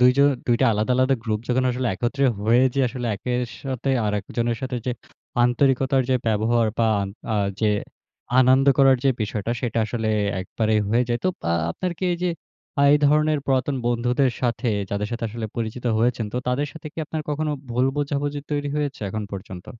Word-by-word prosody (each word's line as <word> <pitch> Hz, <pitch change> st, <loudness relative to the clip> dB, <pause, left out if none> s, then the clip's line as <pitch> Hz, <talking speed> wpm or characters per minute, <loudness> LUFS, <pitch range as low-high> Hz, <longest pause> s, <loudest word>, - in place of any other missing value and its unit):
২ 125 Hz, 0 st, +7 dB
জন 140 Hz, 0 st, +6 dB, 0.2 s
২ 120 Hz, -, +3 dB
টা 130 Hz, -, +5 dB
আলাদা, 110 Hz, +4 st, 0 dB
আলাদা 130 Hz, +1 st, +3 dB
গ্রুপ 110 Hz, -2 st, -1 dB
যখন 130 Hz, +1 st, +2 dB
আসলে 125 Hz, 0 st, -2 dB
একত্রে 130 Hz, +7 st, -1 dB, 0.2 s
হয়ে 115 Hz, +4 st, +4 dB
যে, 140 Hz, -, +2 dB
আসলে 125 Hz, 0 st, -4 dB
একের 125 Hz, +3 st, -2 dB, 0.2 s
সাথে 135 Hz, 0 st, -2 dB, 0.2 s
আরেকজনের 115 Hz, +3 st, -1 dB
সাথে 130 Hz, -1 st, -2 dB
যে, -, -, +1 dB, 0.5 s
আন্তরিকতার 130 Hz, +1 st, +2 dB
যে, -, -, +4 dB
ব্যবহার 110 Hz, +2 st, +2 dB
বা 115 Hz, -1 st, +3 dB, 0.5 s
আ -, -, +1 dB, 0.2 s
যে, 110 Hz, -1 st, +3 dB, 0.7 s
আনন্দ 130 Hz, +2 st, +5 dB
করার 135 Hz, -1 st, +6 dB
যে, 135 Hz, -, +5 dB
বিষয়টা, 105 Hz, +1 st, -2 dB
সেটা 115 Hz, -2 st, -1 dB
আসলে 110 Hz, -1 st, -2 dB, 0.3 s
একবারেই 110 Hz, +3 st, 0 dB
হয়ে 115 Hz, +4 st, +3 dB
যায়। 120 Hz, -, 0 dB
তো -, -, +4 dB
পা 85 Hz, -, -1 dB, 0.2 s
আপনার 180 Hz, -, -3 dB
কি -, -, -2 dB
এই -, -, -1 dB
যে, 180 Hz, -, +2 dB, 0.5 s
আ -, -, +4 dB
এই 150 Hz, -, +5 dB
ধরনের 150 Hz, +1 st, +3 dB
পুরাতন 135 Hz, +1 st, +1 dB
বন্ধুদের 120 Hz, +2 st, +1 dB
সাথে, 120 Hz, 0 st, 0 dB, 0.2 s
যাদের 105 Hz, +1 st, -2 dB
সাথে 115 Hz, 0 st, -3 dB
আসলে 110 Hz, 0 st, -5 dB
পরিচিত 115 Hz, +2 st, -4 dB
হয়েছেন। 115 Hz, -1 st, +1 dB
তো -, -, -3 dB
তাদের 140 Hz, +4 st, 0 dB
সাথে 160 Hz, -1 st, -10 dB
কি -, -, -11 dB
আপনার 155 Hz, 0 st, -4 dB
কখনো 150 Hz, +1 st, -1 dB, 0.2 s
ভুল 125 Hz, +2 st, +2 dB
বোঝাবুঝি 145 Hz, 0 st, -1 dB
তৈরি 145 Hz, -1 st, -1 dB
হয়েছে, 145 Hz, -2 st, -2 dB
এখন 110 Hz, +2 st, -3 dB
পর্যন্ত? 95 Hz, -2 st, -8 dB
125 Hz, 190 wpm, -23 LUFS, 115-140 Hz, 0.7 s, ২